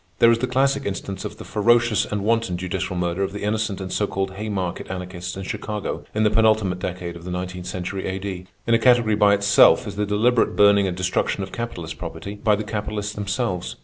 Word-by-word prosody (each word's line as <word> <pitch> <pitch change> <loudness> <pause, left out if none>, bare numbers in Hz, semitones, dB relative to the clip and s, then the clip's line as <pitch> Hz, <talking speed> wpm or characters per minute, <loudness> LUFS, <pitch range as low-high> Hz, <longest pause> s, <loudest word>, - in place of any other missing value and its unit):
There 115 - +6
is 115 - +2
the 130 - 0
classic 135 +1 +1
instance 100 -1 -5
of - - -6
the - - -8
ferocious 115 0 +3
and 105 -1 -3
wanton 115 -4 +1
judicial 95 +1 -3
murder 90 +1 -1
of 95 0 -1
the 105 - -6
innocent 105 -1 -1
and 95 -1 -5
so 105 - +1
called 95 -1 -2
Haymarket 95 -3 -4
Anarchists 90 -1 -5
in 95 - -5
Chicago 105 +2 -4
in 110 - +2
the 105 - +3
penultimate 110 -5 +3
decade 90 -1 -4
of 85 - -10
the 90 - -7
nineteenth 90 0 -5
century 95 +1 -4
A.D. 95 -1 -4 0.2
In 115 - +2
a 115 - +5
category 120 -3 +4
by 105 -1 +5
itself 100 0 +5
is - - -6
the 105 0 0
deliberate 115 +4 +2
burning 100 -1 +5
and 90 -1 -3
destruction 95 +1 0
of 95 - -7
capitalist 90 -9 -5
property 100 - -6
by 105 0 +2
the 105 - -3
capitalists 105 0 -3
themselves. 105 -2 -2
100 Hz, 210 wpm, -23 LUFS, 95-110 Hz, 0.2 s, There